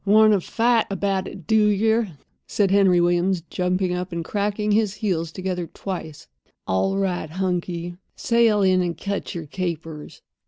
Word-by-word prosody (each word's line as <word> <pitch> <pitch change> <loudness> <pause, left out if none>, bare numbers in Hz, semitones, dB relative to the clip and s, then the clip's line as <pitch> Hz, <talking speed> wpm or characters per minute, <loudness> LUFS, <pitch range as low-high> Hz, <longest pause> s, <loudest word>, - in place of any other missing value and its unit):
"Wanter 215 0 +5
fight 230 +4 +1
about 195 -1 -1
it, 185 -5 -10
do 220 +1 +4
yer?" 220 -1 +1 0.3
said 200 -2 +1
Henry 195 -3 +5
Williams, 175 +1 +2
jumping 180 0 0
up 180 +1 -4
and 170 -1 -4
cracking 210 +2 -1
his 210 -1 +2
heels 180 -6 -2
together 180 -1 -3
twice. 160 -6 -7 0.4
"All 195 - 0
right, 185 -5 -1
hunky—sail 185 +5 0
in 185 -1 +4
and 170 -2 -2
cut 200 +1 -4
yer 165 -2 -5
capers." 165 -2 -6
190 Hz, 145 wpm, -23 LUFS, 175-205 Hz, 0.4 s, Wanter